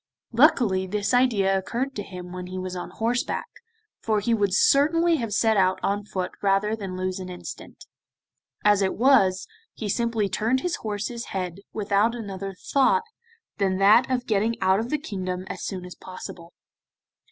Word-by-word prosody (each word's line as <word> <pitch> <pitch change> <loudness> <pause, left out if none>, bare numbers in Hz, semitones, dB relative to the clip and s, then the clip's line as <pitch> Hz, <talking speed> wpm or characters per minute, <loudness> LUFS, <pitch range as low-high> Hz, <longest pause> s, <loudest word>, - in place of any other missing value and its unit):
Luckily 235 - +4
this 205 +4 -1
idea 220 -6 +3
occurred 240 +8 -2
to 205 - -3
him 180 -2 -9
when 180 0 -6
he 185 +1 -6
was 185 0 -4
on 180 - -5
horseback, 235 +2 -1 0.6
for 215 -2 +1
he 230 +3 0
would 205 -3 +1
certainly 320 - +4
have 230 -5 -3
set 220 +1 +2
out 185 -1 +3
on 205 +1 -1
foot 185 -3 -3
rather 200 +2 +2
than 195 -4 -6
lose 185 +1 -2
an 185 -1 -6
instant. 180 -1 -9 0.8
As 205 -1 +5
it 190 - 0
was, 200 -7 +4 0.3
he 215 - -4
simply 230 0 0
turned 225 +7 0
his 355 +2 -1
horse's 220 +2 -4
head, 180 -2 -4
without 210 +2 +1
another 195 -4 -6
thought 280 - +2 0.6
than 190 -2 +1
that 215 +6 +5
of 250 -1 -1
getting 220 +1 0
out 190 +1 +3
of 230 +2 -3
the 300 - +1
kingdom 185 - -4
as - - -7
soon 185 -2 -4
as 180 - -8
possible. 175 -2 -10
205 Hz, 170 wpm, -25 LUFS, 185-235 Hz, 0.8 s, As